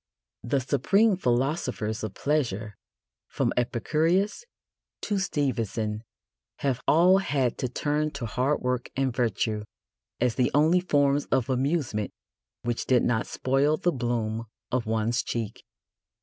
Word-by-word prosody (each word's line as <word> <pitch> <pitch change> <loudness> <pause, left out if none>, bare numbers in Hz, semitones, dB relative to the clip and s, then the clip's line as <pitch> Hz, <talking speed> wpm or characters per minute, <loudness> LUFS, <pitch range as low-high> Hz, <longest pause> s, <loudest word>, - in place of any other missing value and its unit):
The 130 +4 0
supreme 190 - +3
philosophers 125 - -1
of 110 -3 -4
pleasure, 115 -9 -1 0.5
from - - -1
Epicurus 160 - +1 0.6
to 205 -2 -1
Stevenson, 115 - -1 0.6
have 130 -3 0
all 180 +5 +6
had 135 -9 0
to 125 - -1
turn 150 +4 0
to 140 -4 -4
hard 130 +6 0
work 125 -1 -1
and 130 -2 0
virtue 110 -2 0 0.6
as 125 -1 +2
the 125 0 +2
only 160 +5 +5
forms 145 -5 +2
of 130 0 0
amusement 130 - 0 0.5
which 120 0 -2
did 125 -2 +4
not 115 -2 +1
spoil 140 +4 +1
the 175 - +1
bloom 115 -4 -2 0.2
of 120 -3 0
one's 110 +2 +1
cheek. 115 -3 -4
130 Hz, 125 wpm, -27 LUFS, 115-150 Hz, 0.6 s, all